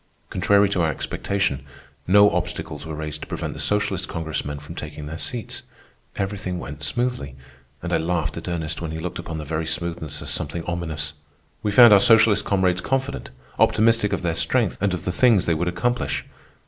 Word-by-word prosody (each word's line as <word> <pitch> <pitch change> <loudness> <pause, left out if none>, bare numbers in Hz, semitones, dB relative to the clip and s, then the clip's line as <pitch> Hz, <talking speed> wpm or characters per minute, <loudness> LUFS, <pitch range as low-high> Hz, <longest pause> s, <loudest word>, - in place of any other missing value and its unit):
Contrary 100 0 +4
to 95 -2 0
our 80 - +2
expectation, 95 0 -2 0.4
no 100 +2 +6
obstacles 85 -3 -3
were 80 - -5
raised 75 0 -5
to - - -7
prevent - - -4
the - - -9
socialist 100 -3 0
Congressmen 80 -3 -4
from 75 +3 -9
taking 75 -3 -7
their 80 +2 -6
seats. 120 +6 -5 0.5
Everything 95 -2 -3
went 75 -3 -7
smoothly, 75 - -2 0.5
and 90 0 -2
I - - +4
laughed 80 -2 -1
at 85 - -7
Ernest 80 -2 -3
when 85 - -3
he 80 - -4
looked 85 +2 -5
upon 85 -2 -5
the 75 - -5
very 80 +2 -2
smoothness 80 -2 -3
as - - -3
something 85 - -3
ominous. 85 -3 -3 0.5
We 105 - 0
found 120 0 +9
our 100 - +8
socialist 110 0 +6
comrades 95 -2 +1
confident, 135 +1 -2 0.3
optimistic 115 -1 +4
of - - -2
their 85 -1 +1
strength - - +1
and 100 -2 +1
of 85 - -8
the 90 - 0
things 110 -1 +4
they 85 - +2
would 85 +3 -1
accomplish. 115 +8 -1
85 Hz, 185 wpm, -23 LUFS, 80-100 Hz, 0.5 s, found